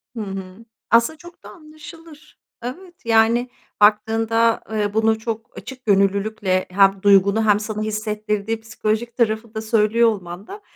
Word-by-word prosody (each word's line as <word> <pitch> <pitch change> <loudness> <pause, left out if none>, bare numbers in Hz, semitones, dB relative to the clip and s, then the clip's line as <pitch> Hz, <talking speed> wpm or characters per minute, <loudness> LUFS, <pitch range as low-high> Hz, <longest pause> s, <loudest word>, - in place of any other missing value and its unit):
Hı 225 - -4
hı. 195 +2 -8 0.3
Aslında 235 +7 +3
çok 345 +2 -15
da - - -11
anlaşılır. 310 0 -14 0.2
Evet, 350 +8 -8
yani, 230 +2 +3 0.3
baktığında, 225 +2 +3
eee, 210 -1 -1
bunu 220 0 +2
çok 225 +1 -6
açık 255 -1 -10
gönüllülükle 200 -1 +1
hem 195 0 +3
duygunu 200 +2 +4
hem 205 -1 +4
sana 215 0 -5
hissettirdiği 215 0 -3
psikolojik 225 +1 -3
tarafı 220 -1 -1
da 220 - -4
söylüyor 225 +1 +3
olman 185 -2 -6
da 415 +1 -9
220 Hz, 140 wpm, -21 LUFS, 205-235 Hz, 0.3 s, duygunu